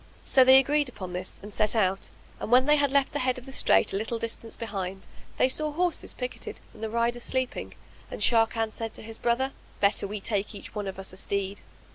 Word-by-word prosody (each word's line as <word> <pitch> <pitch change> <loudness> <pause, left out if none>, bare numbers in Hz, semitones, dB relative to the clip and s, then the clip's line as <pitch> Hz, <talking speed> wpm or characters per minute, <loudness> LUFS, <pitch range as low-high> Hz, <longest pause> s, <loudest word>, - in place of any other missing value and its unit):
So 260 - +6
they 260 +1 +9
agreed 285 +1 +3
upon 185 -7 -7
this 180 +1 -4
and 205 0 -8
set 215 +2 +1
out; 195 -3 +1 0.3
and, - - -4
when 255 +1 +6
they 300 +1 +5
had 285 -2 +2
left 280 -1 +3
the 290 - -2
head 255 0 +1
of 255 - -9
the 270 - -8
strait 265 - +3
a - - +1
little 225 +3 -2
distance 230 0 -4
behind, 195 -4 -5 0.3
they - - +4
saw 305 +3 0
horses 350 +2 -1
picketed 250 0 -6
and - - -14
the 220 - -2
riders 235 +1 0
sleeping: 260 +1 -2 0.3
and - - -6
Sharrkan 225 +1 +2
said 225 0 -5
to - - -2
his 225 0 -8
brother, 245 +3 +1 0.3
"Better 200 0 +2
we 210 +1 -4
take 205 +1 -2
each 200 - -8
one 210 -2 -3
of 190 - -5
us 195 -1 -4
a - - -11
steed." 200 +1 -2
230 Hz, 225 wpm, -27 LUFS, 205-260 Hz, 0.3 s, they